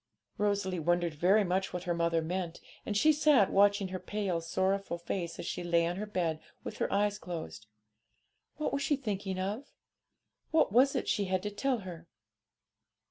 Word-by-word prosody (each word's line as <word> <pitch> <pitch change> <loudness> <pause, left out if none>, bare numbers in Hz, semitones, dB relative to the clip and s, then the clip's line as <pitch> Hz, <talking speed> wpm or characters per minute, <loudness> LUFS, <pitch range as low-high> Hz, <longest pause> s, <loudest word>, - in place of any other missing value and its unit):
Rosalie 200 -3 0
wondered 175 +1 +1
very 185 +7 +4
much 190 +1 0
what 180 0 -4
her 175 -2 0
mother 170 -1 +1
meant, 175 0 -3 0.3
and 205 - 0
she 310 +8 +5
sat 295 -9 +4
watching 200 -1 +4
her 185 0 -4
pale, 185 -2 -2
sorrowful 190 +2 -1
face 170 0 -4
as - - -6
she 175 - -3
lay 170 -1 +2
on 175 +2 -2
her 210 +2 -4
bed 170 -6 -1 0.2
with - - -6
her - - 0
eyes 205 +1 +1
closed. 165 - -7 0.9
What 305 - -2
was 280 - 0
she 290 - +2
thinking 200 -7 -3
of? 205 +9 -4 0.8
What 315 -10 +3
was 260 +5 +4
it - - -1
she 205 - +1
had 185 -1 -1
to 210 - -3
tell 240 +3 -1
her? 170 -2 -9
190 Hz, 180 wpm, -31 LUFS, 175-210 Hz, 0.9 s, she